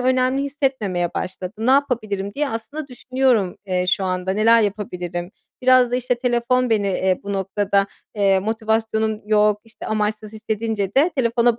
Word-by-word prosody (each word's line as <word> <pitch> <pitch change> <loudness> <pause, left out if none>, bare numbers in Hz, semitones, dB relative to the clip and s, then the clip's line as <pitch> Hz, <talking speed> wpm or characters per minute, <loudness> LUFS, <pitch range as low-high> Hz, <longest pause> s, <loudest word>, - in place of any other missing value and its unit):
önemli 255 +1 +2
hissetmemeye 260 - -1
başladım. 190 +4 -4
"Ne - - +4
yapabilirim?" 215 -8 0
diye 295 0 0
aslında 275 +6 -6
düşünüyorum, 250 -6 0
eee, 180 -1 0
şu 190 +1 +1
anda, 185 0 -1
"Neler 225 +3 +5
yapabilirim?" 180 -4 -3 0.3
Biraz 255 -1 +5
da 250 - +1
işte, 250 0 0
telefon 250 0 +1
beni, 210 -3 +2
eee, 185 -1 0
bu 200 - -4
noktada, 195 +1 0 0.3
eee 195 -2 +3
motivasyonum 220 0 -1
yok 210 -1 +3
işte, 225 +1 -11
amaçsız 215 0 -2
hissedince 215 -2 -3
de 295 +6 +4
telefona 235 -2 +2
220 Hz, 150 wpm, -21 LUFS, 200-250 Hz, 0.3 s, Neler